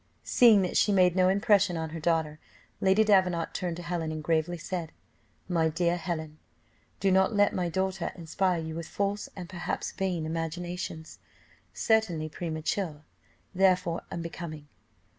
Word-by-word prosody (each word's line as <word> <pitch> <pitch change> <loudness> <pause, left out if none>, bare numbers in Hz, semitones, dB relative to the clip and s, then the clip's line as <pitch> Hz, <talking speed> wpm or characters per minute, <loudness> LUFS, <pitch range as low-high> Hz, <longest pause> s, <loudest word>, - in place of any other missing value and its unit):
Seeing 225 -5 +6
that 180 - -1
she 210 - +4
made 180 -3 +4
no 185 -1 +4
impression 200 -2 +3
on 160 -1 -4
her 165 - -5
daughter, 160 -2 0 0.4
Lady 195 +3 +4
Davenant 185 -5 +2
turned 175 -3 -3
to 175 - -7
Helen, 170 -2 -2
and 155 -1 -5
gravely 165 +2 0
said, 170 -1 -5 0.6
"My 165 -3 +2
dear 170 +2 +1
Helen, 160 -3 -5 0.6
do 195 - +2
not 190 +3 +3
let 205 0 +4
my 180 -2 -1
daughter 190 +1 -1
inspire 180 +2 0
you 160 0 -5
with 165 0 -5
false, 200 +1 -2
and 180 -3 -7
perhaps 175 0 -4
vain 180 -4 -2
imaginations, 165 0 -5 0.5
certainly 185 -9 +1
premature, 160 0 -3 0.5
therefore 180 -2 +2
unbecoming." 170 -3 -6
175 Hz, 145 wpm, -28 LUFS, 160-190 Hz, 0.6 s, Seeing